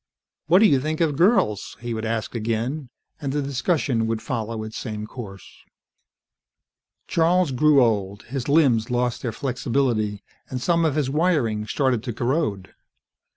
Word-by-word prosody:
"What 180 +6 +6
do - - +8
you 140 -9 +4
think 155 +2 -2
of 160 -4 +1
girls?" 170 - +2
he 120 0 -4
would 110 0 -3
ask 110 0 -2
again, 120 +5 -2 0.3
and 140 -2 -2
the 145 - -1
discussion 135 -4 0
would 115 0 -1
follow 110 -1 -4
its 110 0 -8
same 105 -2 -5
course. 105 -5 -9 1.6
Charles 170 -1 +2
grew 140 +1 +5
old. 100 -3 -1
His 135 +1 -5
limbs 135 -8 +3
lost 125 0 0
their 120 - -2
flexibility, 120 -4 -1 0.3
and 130 -2 -3
some 170 +5 +2
of 150 -3 +1
his 140 -4 0
wiring 140 -10 +1
started 130 -1 +1
to 120 0 -5
corrode. 120 - -1
125 Hz, 155 wpm, -23 LUFS, 110-150 Hz, 1.6 s, do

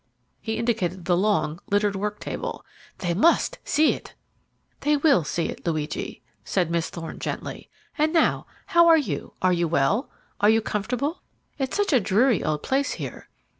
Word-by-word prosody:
He 220 - -3
indicated 190 -7 -1
the 175 0 +3
long, 180 -4 +1
littered 205 0 +2
work 210 +2 -3
table. - - -5 0.3
"They 175 -2 -1
must 320 - +3
see 305 +2 +3
it." - - -10 0.6
"They 295 0 +2
will 280 - +4
see 165 +2 -2
it, - - -6
Luigi," 155 -3 -3 0.2
said 180 -4 0
Miss 170 -1 0
Thorne 165 -2 -7
gently. - - -5 0.3
"And 310 +1 +3
now, 330 -1 +2 0.2
how 340 0 +5
are 330 -1 +8
you? 200 - -3
Are 185 -1 +4
you 170 -1 +1
well? 170 - +1 0.3
Are 205 - +5
you 225 +1 +5
comfortable? 245 - -2 0.4
It's 265 +5 -1
such 410 -6 +1
a 260 - +6
dreary 220 +3 +2
old 150 -1 -1
place 275 +1 0
here." - - -7
210 Hz, 170 wpm, -25 LUFS, 175-275 Hz, 0.6 s, are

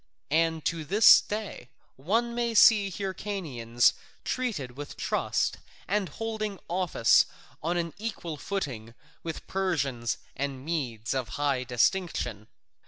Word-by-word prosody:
And 160 0 +1
to 165 -1 -1
this 210 +8 +7
day 210 - -6 0.3
one 225 - 0
may 235 -1 -1
see 210 -2 +7
Hyrcanians 175 - 0 0.3
treated 195 - -3
with 145 +1 -8
trust - - 0 0.3
and 200 -2 0
holding 215 +2 -4
office 175 -10 +3 0.3
on 170 +3 0
an 170 -1 -2
equal 200 -7 -4
footing 130 - -4 0.3
with 165 -1 -6
Persians 140 - -1 0.2
and 135 -1 -4
Medes 125 -9 -2
of 130 -3 -1
high 140 -3 +1
distinction. 120 - 0
165 Hz, 115 wpm, -28 LUFS, 130-200 Hz, 0.3 s, this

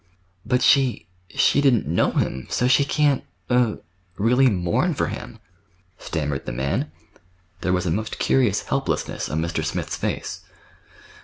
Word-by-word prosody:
"But 125 +2 +1
she—she 100 - +2
didn't 130 -6 +3
know - - +2
him, 65 0 -1
so 125 - +1
she 135 +2 +5
can't—er—really 115 - 0
mourn 100 - 0
for - - 0
him," 120 -2 -7 0.6
stammered 75 -4 -3
the - - -2
man. 65 +3 -2 0.7
There 90 - -1
was 90 0 +1
a 85 - 0
most 110 +5 -2
curious 120 -7 +2
helplessness - - -2
on 80 +1 -1
Mr. 85 +1 -2
Smith's - - -3
face. - - -3
105 Hz, 130 wpm, -23 LUFS, 90-125 Hz, 0.7 s, she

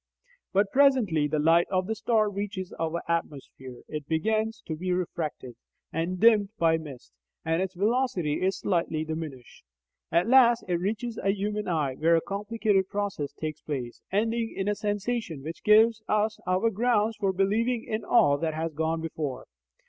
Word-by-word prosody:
But 195 +1 +2
presently 250 - +3
the 155 +1 -1
light 165 +3 +4
of 185 -1 0
the 220 - -2
star 220 -1 +1
reaches 200 -2 -4
our 165 +1 -2
atmosphere. 135 -6 -4
It 150 -2 -6
begins 220 +6 -1
to 160 - -4
be 180 +4 -3
refracted, 165 -7 -3 0.4
and 175 +3 -2
dimmed 215 -2 +5
by 165 -3 +3
mist, 140 -6 -11 0.3
and 165 +2 +1
its 190 0 -3
velocity 200 - 0
is 190 +1 +1
slightly 165 -4 -1
diminished. 155 -6 -7 0.5
At 170 +4 +2
last 240 -2 +5
it 175 -2 0
reaches 220 +5 -3
a 195 - 0
human 210 +1 -3
eye, 155 -6 0
where 165 +2 +4
a 165 - +2
complicated 205 -1 0
process 200 -8 -3
takes 155 -1 -5
place, 130 -5 -5
ending 225 +3 0
in 195 0 -2
a 210 - +2
sensation 205 - -3
which 160 +3 -7
gives 220 +1 +5
us 215 0 +1
our 185 +5 +2
grounds 220 0 +1
for 200 -3 +1
believing 220 +5 0
in 215 0 -3
all 145 -13 +4
that 160 -2 -2
has 160 0 -3
gone 160 +2 -1
before. 155 -4 -4
190 Hz, 165 wpm, -27 LUFS, 160-215 Hz, 0.5 s, dimmed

